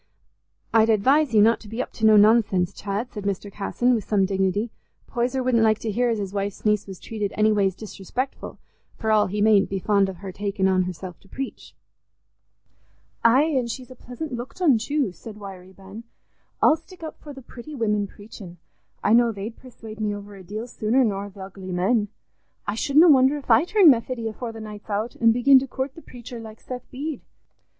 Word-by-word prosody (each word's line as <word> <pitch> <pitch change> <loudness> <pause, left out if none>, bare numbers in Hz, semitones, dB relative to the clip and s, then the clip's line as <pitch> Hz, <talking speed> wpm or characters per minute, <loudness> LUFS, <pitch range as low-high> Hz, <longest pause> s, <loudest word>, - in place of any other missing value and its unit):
"I'd 225 0 +5
advise 260 +7 +3
you 215 -2 +5
not 230 +1 +4
to 215 - -14
be 225 +3 -7
up - - -3
to 220 - +2
no 215 -1 +7
nonsense, 205 -4 +4
Chad," 205 +5 -4
said 210 -3 -6
Mr. 200 0 -3
Casson, 240 +5 0
with 225 -3 0
some 200 -1 +2
dignity; 195 +3 0 0.3
"Poyser 250 +2 -1
wouldn't 250 -2 +2
like 215 -1 +4
to 225 - -4
hear 245 +4 +1
as 230 - 0
his 200 -2 -5
wife's 200 +1 -4
niece 210 -1 +2
was 190 -2 -9
treated 210 -3 -4
any 215 0 +4
ways 195 -3 +1
disrespectful, 220 +6 -6 0.4
for 220 - -1
all 215 -1 +4
he 205 +2 -1
mayn't 210 -2 +4
be 195 - -2
fond 200 0 +2
of 190 - -6
her 195 +1 -7
taking 200 0 -1
on 185 -1 +2
herself 180 -1 -7
to 195 - -23
preach." 270 +5 -7 1.5
"Aye, 240 +5 +5
an' 270 -6 0
she's 250 +2 -7
a - - -10
pleasant 250 +5 -8
looked 245 +8 -7
un 290 -11 +4
too," 280 -2 -1
said 210 +5 -11
Wiry 190 -2 -10
Ben. 195 +4 -11 0.6
"I'll 310 - +6
stick 335 +2 -16
up 315 - -7
for 295 - -10
the 270 -2 -11
pretty 255 +6 -10
women 210 -4 0
preachin'; 205 -4 -12 0.5
I 205 - +3
know 235 0 +5
they'd 215 +2 -6
persuade 225 -4 -12
me 210 -1 -1
over 205 0 -10
a 195 - -11
deal 210 +5 -6
sooner 240 +2 +1
nor 200 -3 -2
th' 200 - -20
ugly 190 -1 -8
men. 205 +5 +1 0.6
I 205 - -2
shouldna 285 +9 +4
wonder 270 0 +5
if 275 -4 -4
I 225 +8 +6
turn 375 -5 +6
Methody 235 -1 -1
afore 230 +2 -5
the 225 0 -9
night's 210 0 -10
out, 215 +3 -2
an' 230 0 +6
begin 260 +3 +6
to 270 - -5
coort 265 +1 -4
the 330 - -12
preacher, 245 -3 -10
like 220 -1 -10
Seth 250 -1 -8
Bede." 285 +1 -5
220 Hz, 205 wpm, -24 LUFS, 200-250 Hz, 1.5 s, no